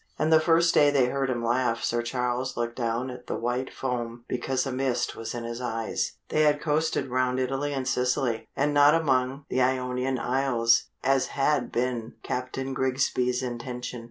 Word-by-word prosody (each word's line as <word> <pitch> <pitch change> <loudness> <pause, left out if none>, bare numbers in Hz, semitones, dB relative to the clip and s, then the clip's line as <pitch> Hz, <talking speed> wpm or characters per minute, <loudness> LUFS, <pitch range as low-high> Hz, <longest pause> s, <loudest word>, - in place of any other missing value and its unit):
And 155 +1 +2
the 160 - +8
first 165 +1 +3
day 145 -1 +6
they 140 -3 +3
heard 135 0 -1
him 120 -2 -1
laugh 120 -1 +1
Sir 120 0 +1
Charles 125 +1 -2
looked 120 0 -2
down 120 +1 -2
at 125 0 -11
the - - -2
white 125 +2 -2
foam 120 -2 -4
because 130 +1 -1
a 135 - -3
mist 130 -2 -1
was 115 +1 -5
in 120 - -4
his 115 +1 -5
eyes. 115 -2 -2 0.2
They 155 - +2
had 150 -1 +4
coasted 155 -2 0
round 130 0 +1
Italy 135 +3 -1
and 135 -2 -3
Sicily, 125 -2 0
and 145 +1 +1
not 145 +1 +6
among 135 -3 +1
the 130 - 0
Ionian 125 0 0
Isles, 120 -2 +2 0.2
as 135 -1 +2
had 135 -2 +1
been 120 -2 -2
Captain 130 +1 -3
Grigsby's 130 -1 0
intention. 125 0 -5
130 Hz, 180 wpm, -27 LUFS, 120-135 Hz, 0.2 s, the